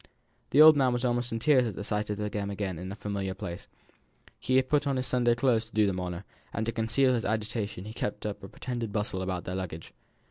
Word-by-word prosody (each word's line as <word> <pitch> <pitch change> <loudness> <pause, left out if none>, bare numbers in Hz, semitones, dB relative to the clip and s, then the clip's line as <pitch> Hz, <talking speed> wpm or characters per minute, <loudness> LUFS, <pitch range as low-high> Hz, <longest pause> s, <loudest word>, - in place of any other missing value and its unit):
The 150 +3 +7
old 155 0 +10
man 130 -3 +3
was 120 +1 -1
almost 120 0 0
in 115 - -1
tears 125 +1 +4
at 105 - -5
the - - -5
sight 105 +1 -2
of 105 - -2
them 105 -1 -3
again 100 -4 -3
in 95 +2 -6
a - - -5
familiar 100 -2 -3
place. 85 -2 -7 0.7
He 130 - 0
had 130 0 +4
put 150 +1 +2
on 140 - +1
his 130 - -1
Sunday 120 -2 +2
clothes 120 -2 +2
to 115 - -20
do 110 -1 +4
them 95 -2 -1
honour; 90 0 -4 0.3
and 110 - -2
to 115 - -1
conceal 120 +4 +2
his 115 -3 0
agitation 105 -2 -2
he 110 - -7
kept 105 -2 -4
up 105 -2 -4
a 95 - -8
pretended 120 -2 -4
bustle 105 -3 -1
about 95 -1 -3
their 90 - -5
luggage. 90 -4 -6
110 Hz, 245 wpm, -29 LUFS, 100-120 Hz, 0.7 s, old